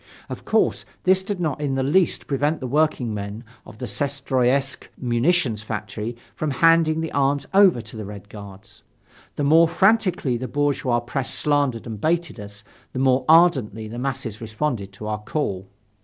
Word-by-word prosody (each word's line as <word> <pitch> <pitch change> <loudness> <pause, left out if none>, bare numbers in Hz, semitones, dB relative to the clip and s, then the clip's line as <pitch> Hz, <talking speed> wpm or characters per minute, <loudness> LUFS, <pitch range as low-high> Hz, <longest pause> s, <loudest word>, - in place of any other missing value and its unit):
Of - - -7
course, - - +1 0.2
this 185 +1 +4
did 195 0 -4
not 155 -4 -2
in 140 -2 -1
the 135 - 0
least 170 +6 +2
prevent 145 +3 0
the 130 - -5
workingmen 120 -7 -1 0.2
of 110 - -12
the 125 - -5
Syestroyetsk 135 0 -1
munitions 125 -1 +1
factory 110 +1 -5 0.2
from 155 - -2
handing 160 +2 +3
the 160 - -4
arms 140 0 +1
over 190 -10 +5
to 110 0 -11
the 110 - -5
Red 100 0 -9
Guards. 100 -2 -12 0.5
The 145 - -2
more 160 +4 +6
frantically 185 - +2
the 130 +2 -5
bourgeois 140 -4 0
press 125 +2 -3
slandered 145 -6 0
and 110 -3 -7
baited 170 -4 0
us, 100 0 -10 0.3
the - - -6
more 130 0 +2
ardently 135 - +4
the 115 +3 -7
masses 130 -5 -4
responded 110 -2 -3
to 105 +3 -9
our 105 0 -3
call. 100 -6 -3
130 Hz, 165 wpm, -23 LUFS, 110-155 Hz, 0.5 s, more